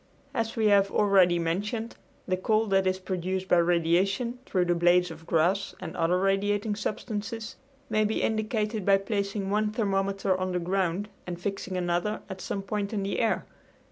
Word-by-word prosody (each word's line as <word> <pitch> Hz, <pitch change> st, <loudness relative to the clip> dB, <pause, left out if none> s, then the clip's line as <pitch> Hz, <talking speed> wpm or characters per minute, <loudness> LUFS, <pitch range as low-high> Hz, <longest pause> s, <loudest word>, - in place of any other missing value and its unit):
As 225 Hz, -2 st, -2 dB
we 225 Hz, -2 st, +1 dB
have 200 Hz, -1 st, +4 dB
already 190 Hz, -4 st, +4 dB
mentioned, 205 Hz, +7 st, -2 dB, 0.3 s
the 185 Hz, -, +1 dB
cold 215 Hz, +3 st, +1 dB
that 195 Hz, -1 st, +3 dB
is 185 Hz, 0 st, +1 dB
produced 185 Hz, 0 st, -3 dB
by 180 Hz, -, +4 dB
radiation 175 Hz, +8 st, +2 dB
through 180 Hz, -2 st, +1 dB
the 175 Hz, -, +2 dB
blades 175 Hz, 0 st, +3 dB
of 165 Hz, +1 st, -11 dB
grass 175 Hz, +5 st, +1 dB
and 175 Hz, -3 st, -7 dB
other 170 Hz, +2 st, +2 dB
radiating 205 Hz, +2 st, +1 dB
substances 215 Hz, +1 st, -4 dB, 0.3 s
may 215 Hz, -1 st, +2 dB
be 215 Hz, +1 st, 0 dB
indicated 215 Hz, -1 st, -1 dB
by 195 Hz, +1 st, +5 dB
placing 200 Hz, 0 st, -2 dB
one 210 Hz, +1 st, +2 dB
thermometer 195 Hz, -3 st, 0 dB
on 185 Hz, 0 st, -2 dB
the 180 Hz, -, 0 dB
ground 185 Hz, +2 st, -1 dB, 0.2 s
and 175 Hz, -1 st, -5 dB
fixing 195 Hz, 0 st, -3 dB
another 175 Hz, +4 st, -1 dB
at 190 Hz, -1 st, -7 dB
some 195 Hz, +2 st, -3 dB
point 205 Hz, +1 st, -3 dB
in 200 Hz, -2 st, -1 dB
the 195 Hz, -, -2 dB
air. 225 Hz, -2 st, +1 dB
195 Hz, 170 wpm, -27 LUFS, 180-210 Hz, 0.3 s, by